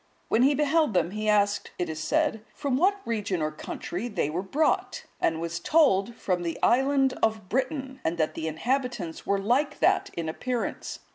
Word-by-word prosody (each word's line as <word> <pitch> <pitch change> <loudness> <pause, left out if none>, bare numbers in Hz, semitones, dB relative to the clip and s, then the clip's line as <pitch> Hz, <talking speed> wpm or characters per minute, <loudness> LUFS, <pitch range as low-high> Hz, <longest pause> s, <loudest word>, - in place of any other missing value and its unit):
When 225 - +3
he 280 +3 +5
beheld 300 - +2
them, 175 0 +2
he 215 +1 -2
asked, 205 -1 +2
it 180 - -1
is 155 -1 -5
said, 295 - +1
from 280 -3 -1
what 390 +7 +2
region 205 -5 -1
or 155 0 -1
country 175 +6 -5
they 175 -10 -1
were 170 +4 -1
brought? 290 +11 0 0.2
and 160 -1 +1
was 170 0 -3
told, 235 - +3
from 180 -5 -1
the 170 -1 -3
island 270 +1 +3
of 220 -4 0
Britain, 265 +1 -2
and 165 +2 -1
that 155 -2 0
the 160 - -4
inhabitants 235 - -2
were 200 - +2
like 255 +9 +1
that 385 +1 +2
in 165 -1 -2
appearance. 245 +9 -3
220 Hz, 185 wpm, -27 LUFS, 175-275 Hz, 0.2 s, he